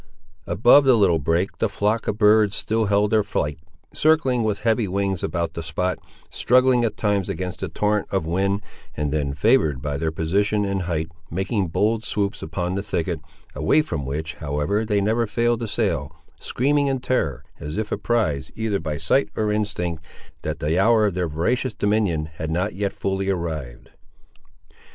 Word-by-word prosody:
Above 120 +10 +6
the 130 -3 +5
little 90 -6 +3
brake, 85 +6 0
the 115 - +1
flocks 105 +3 0
of 105 - -1
birds 105 -1 +4
still 110 0 0
held 100 +1 +2
their 110 -1 +4
flight, 75 -5 -2 0.3
circling 150 -6 +3
with 110 -2 -1
heavy 115 -1 +1
wings 95 -1 -1
about 85 -2 -2
the 85 - -5
spot, 90 +3 -2 0.3
struggling 125 0 +3
at 115 - -1
times 100 -3 0
against 90 -2 -4
the - - -3
torrent 105 -1 0
of 95 -4 -1
wind, 100 +4 0 0.3
and 75 -1 -1
then 70 -2 -1
favoured 105 - +3
by 70 +2 -3
their 80 -1 -1
position 100 +6 0
and 100 -1 -1
height, 80 -1 -1 0.2
making 95 +3 -1
bold 110 +7 0
swoops 100 -2 -2
upon 90 +3 -3
the 100 - -1
thicket, 90 -4 -2 0.3
away 80 - +2
from 80 - -4
which, 75 +4 -4
however, 75 +8 -1
they 105 -2 +1
never 110 +3 +1
failed 120 +1 +1
to 115 - -3
sail, 90 - -1 0.2
screaming 145 +3 +1
in 135 -1 0
terror, 80 - -1 0.2
as 75 +4 -5
if 110 -1 -3
apprised, 95 - 0
either 110 -3 -1
by 75 -2 -3
sight 80 - +2
or 105 -1 0
instinct, 90 -6 -2 0.4
that - - -3
the 80 +5 0
hour 110 +1 +4
of 100 - 0
their 90 -1 -1
voracious 105 - -1
dominion 100 -7 +1
had 80 - -4
not 90 +6 -1
yet 100 +1 -2
fully 95 0 -2
arrived. 80 -9 -4
100 Hz, 175 wpm, -23 LUFS, 80-110 Hz, 0.4 s, Above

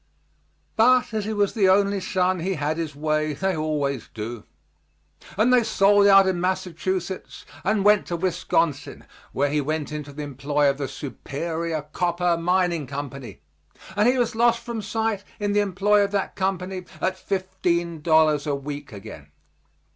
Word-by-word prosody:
But 250 +1 +4
as 215 -2 -1
he 220 - -2
was 205 -1 +1
the 200 -5 +3
only 200 +1 +3
son 185 -1 0
he 185 +3 -1
had 150 +1 -2
his 160 -3 -4
way 155 +1 0
they 190 +5 -1
always 145 -5 -2
do; 110 +1 -6 0.9
and 235 +5 +4
they 250 - +6
sold 205 -2 +4
out 195 -1 +7
in 185 -2 0
Massachusetts 185 0 -3 0.2
and 205 +1 +1
went 210 -1 +4
to 175 - -2
Wisconsin, 170 -4 -1 0.3
where 140 +1 0
he 150 0 +1
went 150 +1 -3
into 150 -1 -6
the 150 +1 -6
employ 145 +1 0
of 140 - -9
the 140 - -2
Superior 160 +3 -4
Copper 175 +3 0
Mining 170 -3 0
Company, 140 -2 -7 0.5
and 210 +2 +3
he 255 - +2
was 245 -1 +1
lost 235 +1 +2
from 235 -2 -4
sight 220 0 -2 0.2
in 205 -1 -1
the 205 - +3
employ 205 +1 +3
of 200 - 0
that 200 -1 -2
company 185 -1 -2
at 185 - 0
fifteen 180 -4 -2
dollars 155 -2 +3
a 145 - +1
week 145 +1 -7
again. 80 -8 -10
180 Hz, 160 wpm, -24 LUFS, 150-200 Hz, 0.9 s, out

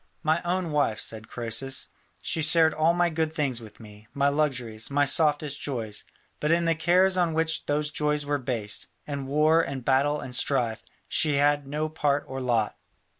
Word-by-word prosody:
"My 155 +2 +2
own 175 -1 -2
wife," 140 -8 +1
said 110 -1 -1
Croesus; 120 +3 -2 0.3
"she 160 - -1
shared 160 0 +5
all 160 +2 +2
my 175 -1 +2
good 160 0 -1
things 140 -7 -2
with 110 -2 -13
me, 105 -1 -14
my 140 0 +3
luxuries, 125 -7 -1
my 145 +1 +2
softest 150 0 +2
joys; 115 -7 -4 0.4
but 150 - -1
in 170 +1 +3
the 165 - +3
cares 185 +4 +3
on 170 -3 +1
which 160 0 0
those 150 +1 0
joys 150 -1 0
were 145 0 0
based, 115 -6 -3 0.2
in 140 -2 -5
war 155 +3 +4
and 135 -6 -5
battle 140 +3 +2
and 125 - -7
strife, 120 -5 0 0.3
she 150 -2 +1
had 145 0 +2
no 150 +2 -2
part 145 -2 0
or 130 0 -5
lot. 115 -4 0
145 Hz, 180 wpm, -26 LUFS, 130-155 Hz, 0.4 s, shared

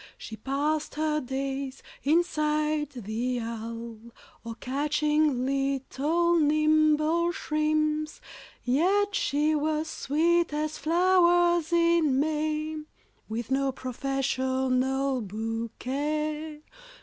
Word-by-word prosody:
She 220 - -8
passed 290 +6 -2
her 305 0 0
days 270 +1 -4 0.2
inside 305 -1 +1
the 245 0 -3
Halle, 230 0 -6 0.4
Or 230 -1 -6
catching 295 0 0
little 275 +5 +1
nimble 310 +2 +3
shrimps. 305 -1 -1 0.4
Yet 380 +11 +2
she 310 -11 +1
was 310 +1 0
sweet 335 +4 +1
as 305 +1 -2
flowers 345 0 +3
in 335 -5 +3
May, 310 +1 -1 0.5
With 230 +3 -4
no 270 0 +1
professional 260 0 -1
bouquet. 280 +9 -3
300 Hz, 85 wpm, -27 LUFS, 265-310 Hz, 0.5 s, nimble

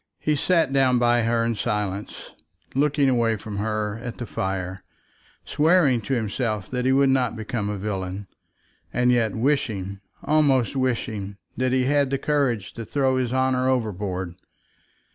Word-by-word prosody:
He 150 - 0
sat 165 -1 +2
down 130 -2 +4
by 120 0 +3
her 115 0 +1
in 115 - +1
silence, 105 -1 -3 0.4
looking 145 +1 +2
away 115 -3 +2
from 105 0 -7
her 105 0 -2
at 120 -2 -6
the 120 - -5
fire, 95 -2 -3 0.6
swearing 150 -6 +3
to 135 +5 -1
himself 110 -3 -2
that 125 -1 -1
he 130 - +3
would 135 0 +4
not 130 -3 +1
become 110 -1 -3
a 105 - -3
villain, 95 -1 -4 0.7
and 125 +1 +2
yet 115 -4 +1
wishing, 110 -7 -1 0.2
almost 140 -5 +2
wishing, 115 -6 -2 0.2
that 130 0 0
he 130 0 +2
had 140 0 +2
the 135 - 0
courage 135 -9 0
to 115 - -6
throw 130 +1 +1
his 125 -2 -1
honour 130 0 +1
overboard. 100 -7 -2
120 Hz, 155 wpm, -24 LUFS, 105-130 Hz, 0.7 s, down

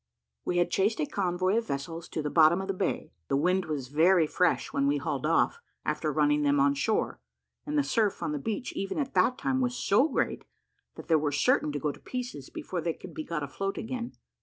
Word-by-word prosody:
We 175 - 0
had 175 0 +2
chased 205 +5 +1
a 150 - +1
convoy 185 +3 0
of 230 - -1
vessels 165 +5 -4
to 155 - -3
the 150 - -2
bottom 160 +2 +5
of 190 - -4
the 195 - 0
bay: 185 - -2 0.2
the 135 - +1
wind 180 +5 +2
was 140 -5 -4
very 165 +4 +4
fresh 180 - +1
when 275 0 +2
we 285 - +2
hauled - - -2
off, 470 - +2 0.2
after - - -1
running 295 0 +2
them 285 -1 +3
on 280 0 +4
shore; 285 - 0 0.5
and 300 0 -1
the 290 - +4
surf 220 -6 0
on - - -1
the 150 - -2
beach 225 - -3
even 195 - -3
at 280 -3 -2
that 255 - +3
time 265 -1 0
was 245 -1 0
so 250 +9 +3
great, - - -1 0.5
that - - -10
they 160 - +5
were 150 -1 0
certain 145 +1 +2
to 145 - -2
go 150 +1 0
to - - -14
pieces 245 - -6
before 180 -2 -4
they 165 0 -1
could 180 - -11
be 155 - -4
got 155 -2 -3
afloat 195 +8 -3
again. 240 +1 -4
185 Hz, 230 wpm, -29 LUFS, 155-250 Hz, 0.5 s, bottom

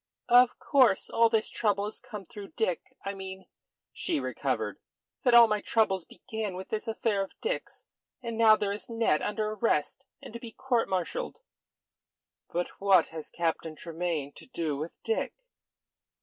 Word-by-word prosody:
"Of 245 0 +6
course. 255 -8 +3
All 230 0 +5
this 225 -1 +2
trouble 205 -2 0
has 210 - -5
come 210 -4 -8
through 200 +2 -10
Dick. 220 -7 0 0.2
I 200 - -2
mean," 190 -1 -8 0.5
she 335 -5 -1
recovered, - - -2 0.4
"that 245 -2 +4
all 235 -1 +10
my 210 -1 0
troubles 190 -6 +1
began 220 -4 -5
with 190 +1 -7
this 220 +2 -3
affair 220 -2 0
of 195 - -6
Dick's. - - -4 0.3
And 235 -3 -5
now 220 -1 +7
there 205 -2 -1
is 200 +1 -5
Ned 230 -9 +2
under 215 0 -1
arrest 220 - 0
and - - -11
to 235 - -6
be 235 -2 -9
court 245 -3 0
martialled." 190 - -2 1.1
"But 175 +1 -1
what 195 -4 +5
has 160 -1 -7
Captain 165 -1 -2
Tremayne 165 -4 -3
to - - -10
do 165 - -2
with 155 +4 -6
Dick?" 450 - -1
210 Hz, 165 wpm, -29 LUFS, 185-230 Hz, 1.1 s, all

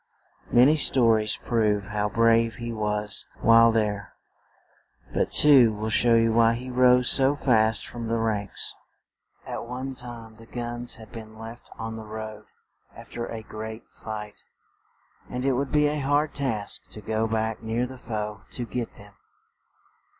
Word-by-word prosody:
Many 135 +6 +5
sto 130 -4 +4
ries 110 -1 +1
prove 105 -4 0
how 105 0 -1
brave 115 +1 +2
he 120 0 -6
was 105 -1 -2
while 115 0 +6
there; 105 -2 -2 1.0
but - - 0
two 135 -6 +7
will 110 +1 -4
show 120 +1 +4
you 115 0 +3
why 115 0 +4
he 125 +2 -7
rose 125 0 +4
so 135 +1 +6
fast 110 -6 +2
from 120 -1 -7
the 115 +1 0
ranks. 110 -3 0 0.7
At - - -6
one 130 +2 -5
time 115 -3 -8
the 115 0 -15
guns 120 0 -4
had 110 -2 -13
been 110 -2 -10
left 115 +2 -11
on 115 0 -6
the 110 -1 -9
road, 110 0 -8 0.5
af - - -13
ter 120 0 -4
a 110 -1 -7
great 110 +1 -8
fight; 105 -1 -8 0.9
and 125 +1 -4
it 135 - +2
would 135 +2 -2
be 150 0 +3
a 150 0 0
hard 145 +2 0
task 115 -8 -3
to 105 - -9
go 110 +2 -1
back 110 0 -2
near 115 +2 -2
the 130 0 -10
foe 105 -3 -5
to 120 - -4
get 120 0 -5
them. 100 0 -13
115 Hz, 165 wpm, -25 LUFS, 110-125 Hz, 1.0 s, two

